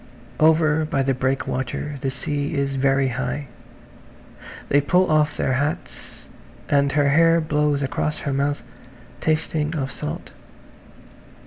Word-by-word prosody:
Over 155 0 +4
by 135 -3 0
the 135 0 +1
breakwater 130 +2 -2
the 135 - -1
sea 145 +3 -3
is 140 -1 0
very 135 0 +2
high. 130 +3 -3 1.2
They 145 - +4
pull 180 +4 +2
off 155 -1 +2
their 130 - 0
hats 145 +3 -4 0.4
and 140 -1 +3
her 145 -1 +3
hair 165 +3 +5
blows 150 -2 +1
across 145 +3 -1
her 140 - -1
mouth, 140 +1 -1 0.6
tasting 155 0 0
of 135 -3 -2
salt. - - -6
145 Hz, 125 wpm, -22 LUFS, 135-155 Hz, 1.2 s, hair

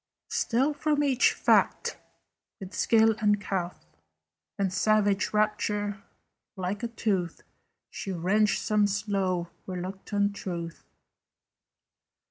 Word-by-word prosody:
Still 295 - +1
from 295 0 +1
each 270 -2 +4
fact, - - +2 0.6
with 190 -1 -9
skill 225 -1 +4
uncouth 200 - -1 0.7
And 195 -2 0
savage 205 -1 +2
rapture, 210 -1 0 0.5
like 190 +1 -3
a 235 - -1
tooth 195 -7 -2 0.5
She 195 - -5
wrenched 195 +5 +2
some 210 -1 +3
slow 190 -4 -1 0.2
reluctant 195 +2 -2
truth. 170 -4 -6
205 Hz, 95 wpm, -28 LUFS, 190-215 Hz, 0.7 s, each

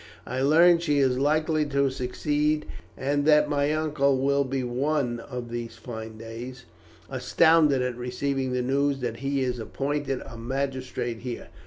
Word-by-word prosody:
I 130 +2 -3
learn 165 +5 +6
she 150 -4 0
is 130 -2 +2
likely 155 +2 +2
to 140 -1 +1
succeed, 150 +4 -1 0.3
and 145 +2 0
that 150 -1 +6
my 145 0 +1
uncle 150 -3 +1
will 140 +1 +2
be 135 -1 -2
one 125 0 -1
of 120 -1 -7
these 120 -1 -5
fine 110 -2 -8
days 120 +3 -8 0.4
astounded 145 +1 +3
at 125 -1 -2
receiving 130 +2 -2
the 125 0 0
news 140 +2 +1
that 115 -2 -3
he 135 +2 -1
is 125 -1 -2
appointed 135 +3 -2
a 115 - -10
magistrate 130 -2 -3
here. 120 0 -6
135 Hz, 155 wpm, -26 LUFS, 125-145 Hz, 0.4 s, learn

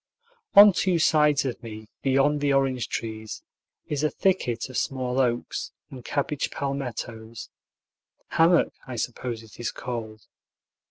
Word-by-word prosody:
On 205 0 +10
two 185 -1 +1
sides 150 -3 +3
of 125 -2 -3
me, 110 -2 -9
beyond 135 +2 +2
the 145 -1 +2
orange 135 -3 +1
trees, 110 -1 -5 0.4
is 145 -2 -2
a 155 - +3
thicket 125 -13 0
of 130 - -11
small 130 -1 -1
oaks 120 -2 -1 0.2
and 130 -2 -9
cabbage 145 +2 -1
palmettos, 120 -5 -5 0.8
hammock, 165 +1 +4
I 130 - -5
suppose 120 0 -4
it 110 - -16
is 120 - -2
called. 110 -4 -6
130 Hz, 130 wpm, -26 LUFS, 115-145 Hz, 0.8 s, On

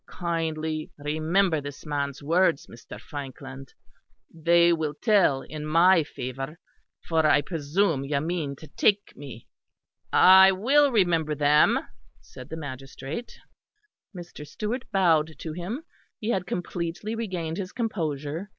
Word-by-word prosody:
Kindly 160 -3 -3
remember 155 +3 0
this 145 +2 -9
man's 140 -2 -3
words, 165 0 +2
Mr. 115 -2 -12
Frankland; 135 0 -9 0.6
they 170 +1 +4
will 155 -3 -2
tell 195 - +2
in 155 -1 -8
my 165 +3 +5
favour. 135 +2 -6 0.5
For 160 -1 +2
I 155 -1 +4
presume 155 0 -1
you 140 0 0
mean 155 -2 -3
to 155 - -13
take 205 +4 +1
me." 135 -5 -10 0.7
"I 190 +1 +8
will 275 +9 +3
remember 170 -8 +1
them," 150 +1 +4 0.4
said 125 - -13
the 160 - -6
magistrate. 140 - -7 0.8
Mr. 175 -3 -9
Stewart 215 - -4
bowed 160 -5 +2
to 160 - -6
him; 190 - -5 0.4
he 215 - -4
had 185 -5 -2
completely 175 +4 -4
regained 180 -8 -4
his 195 -1 -5
composure. 165 - -3
160 Hz, 125 wpm, -26 LUFS, 145-185 Hz, 0.8 s, I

